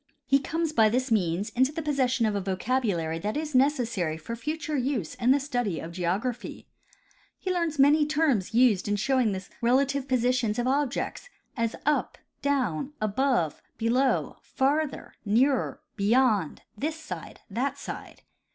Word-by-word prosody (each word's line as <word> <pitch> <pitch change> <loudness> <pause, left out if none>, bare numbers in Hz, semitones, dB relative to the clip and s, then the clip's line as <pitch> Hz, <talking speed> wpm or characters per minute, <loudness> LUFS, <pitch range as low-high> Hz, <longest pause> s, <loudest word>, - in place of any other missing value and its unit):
He 275 - +4
comes 320 +3 -2
by 220 -6 +5
this 255 +3 -1
means 195 0 +1
into 260 +5 +2
the 320 +1 -4
possession 260 -5 +1
of 215 - +1
a 200 - -1
vocabulary 190 -4 -1
that 210 - -2
is 305 -1 -3
neces 265 0 +3
sary 170 -8 -2
for 200 +9 -6
future 305 +5 -3
use 250 - -1
in 240 - 0
the 275 +2 +5
study 245 - -2
of 165 - -7
geography. 195 +8 -3 0.7
He 370 - -2
learns 335 -4 -1
many 290 +2 +5
terms 295 - +1
used 230 -5 +3
in 205 - +1
showing 250 +1 +2
the 190 -1 -5
relative 270 +3 +2
positions 250 -3 +1
of 240 - 0
objects, 275 - -1 0.3
as 230 -2 -1
ud, 300 0 +1 0.2
down, 265 - 0
above, 215 - 0 0.2
beloiv, 250 +4 +1
farther, 285 +2 -1
nearer, 245 +5 +2 0.2
beyond, 210 - +2
this 310 +8 -3
side, 320 - -8
that 265 +6 -1
side. - - -8
250 Hz, 150 wpm, -27 LUFS, 210-280 Hz, 0.7 s, by